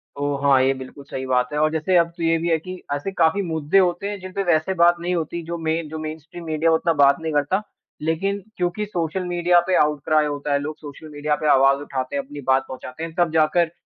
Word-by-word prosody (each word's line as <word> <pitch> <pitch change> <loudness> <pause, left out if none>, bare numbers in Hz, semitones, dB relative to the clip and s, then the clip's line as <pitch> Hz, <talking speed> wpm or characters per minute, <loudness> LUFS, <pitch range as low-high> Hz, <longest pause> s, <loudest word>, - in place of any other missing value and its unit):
तो 145 0 -1
हाँ, 135 -2 +5
ये 135 +1 +3
बिल्कुल 130 +2 -10
सही 130 -1 -6
बात 125 -1 +1
है 150 - 0
और 155 0 +3
जैसे 160 +4 0
अब 170 -1 +4
तो 165 - -4
ये 165 0 +3
भी 170 +1 -2
है 165 - +3
कि 185 +2 -8
ऐसे 145 +7 -3
काफ़ी 180 +1 +2
मुद्दे 160 -1 0
होते 180 +2 +1
हैं, 205 -1 -5
जिन 185 0 -8
पे 195 - -1
वैसे 175 +1 +1
बात 175 0 +6
नहीं 175 +1 -2
होती, 170 +1 -3
जो 170 +1 -5
मेन 160 -1 -2
जो 160 - -6
मेनस्ट्रीम 160 +2 -8
मीडिया 160 +1 +1
उतना 165 +1 +2
बात 140 +5 +5
नहीं 160 -1 -3
करता 145 +7 +1 0.4
लेकिन 170 +6 -1 0.2
क्योंकि 180 +4 -1
सोशल 180 -2 -2
मीडिया 175 0 +3
पे 185 - +2
आउट 150 -1 +2
क्राइ 155 -1 +3
होता 145 0 -2
है 140 - +2
लोग 150 +2 -5
सोशल 150 +1 -11
मीडिया 150 0 -1
पे 155 - 0
आवाज़ 135 +1 +5
उठाते 135 -2 -4
हैं, 140 - -1
अपनी 145 +1 -9
बात 130 0 +2
पहुँचाते 130 +3 -8
हैं। 165 -1 -6
तब 175 -2 +2
जाकर 160 +1 +3
160 Hz, 245 wpm, -22 LUFS, 145-175 Hz, 0.4 s, बात